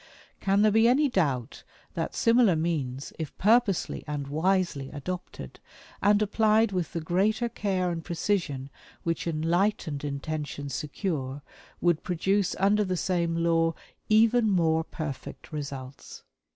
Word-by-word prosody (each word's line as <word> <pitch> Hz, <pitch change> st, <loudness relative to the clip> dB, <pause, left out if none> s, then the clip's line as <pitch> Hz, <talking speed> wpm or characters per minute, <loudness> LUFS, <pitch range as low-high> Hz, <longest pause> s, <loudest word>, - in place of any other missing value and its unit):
Can 195 Hz, +1 st, +2 dB
there 215 Hz, -, +5 dB
be 225 Hz, +2 st, +5 dB
any 280 Hz, +4 st, +4 dB
doubt 140 Hz, -, -1 dB, 0.3 s
that -, -, -3 dB
similar 230 Hz, -5 st, +4 dB
means, 145 Hz, -5 st, -2 dB
if 155 Hz, -4 st, -5 dB
purposely 215 Hz, -2 st, +2 dB
and 145 Hz, -2 st, -4 dB
wisely 165 Hz, -3 st, 0 dB
adopted, 175 Hz, +5 st, -7 dB, 0.4 s
and 205 Hz, 0 st, +4 dB
applied 215 Hz, +1 st, +3 dB
with 180 Hz, -4 st, -2 dB
the 165 Hz, -, -2 dB
greater 200 Hz, +8 st, +1 dB
care 190 Hz, -6 st, -1 dB
and 165 Hz, -1 st, -4 dB
precision 160 Hz, -7 st, -2 dB, 0.3 s
which 165 Hz, 0 st, -2 dB
enlightened 165 Hz, -1 st, 0 dB
intention 145 Hz, 0 st, -4 dB
secure, 145 Hz, -3 st, -3 dB, 0.4 s
would 175 Hz, -2 st, +2 dB
produce 190 Hz, +3 st, 0 dB
under 205 Hz, +2 st, +3 dB
the 185 Hz, -2 st, -2 dB
same 170 Hz, -2 st, 0 dB
law 165 Hz, -1 st, +2 dB, 0.3 s
even 225 Hz, +1 st, +4 dB
more 160 Hz, -4 st, +2 dB
perfect 155 Hz, -5 st, -7 dB
results. 135 Hz, -3 st, -7 dB
170 Hz, 125 wpm, -27 LUFS, 150-205 Hz, 0.4 s, there